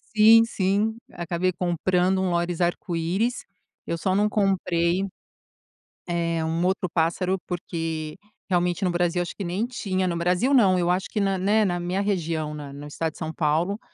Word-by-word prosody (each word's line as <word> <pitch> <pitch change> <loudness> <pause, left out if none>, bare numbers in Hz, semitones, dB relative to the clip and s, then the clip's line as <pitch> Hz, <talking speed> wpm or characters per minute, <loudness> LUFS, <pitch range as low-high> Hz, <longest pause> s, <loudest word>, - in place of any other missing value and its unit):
Sim, 225 +2 +7
sim, 210 +1 0 0.2
acabei 175 +2 -1
comprando 180 +1 +1
um 190 - 0
lóris-arco-íris. 175 +4 -1 0.4
Eu 170 - -1
só 185 +3 0
não 210 +1 +3
comprei, 185 -3 +1 1.0
eh, 170 -2 -1
um 165 +2 -1
outro 185 0 0
pássaro 180 +3 +1
porque, 165 -3 -4 0.3
realmente 175 0 +1
no 180 - +2
Brasil 175 0 +1
acho 175 - -6
que - - -5
nem 185 +6 -1
tinha 190 -6 -2
no 170 - -1
Brasil 180 +10 +1
não, 195 -9 +5
eu 175 0 +1
acho 185 +2 0
que 215 - -1
na, 195 -1 +1
né, 210 +4 +3
na 175 -3 -1
minha 180 +2 -1
região 165 -6 -1
na 145 -2 -7
na 140 - -9
no - - -8
estado 160 +2 -3
de - - -15
São 160 -1 -4
Paulo. 165 +6 0
180 Hz, 170 wpm, -25 LUFS, 170-195 Hz, 1.0 s, Sim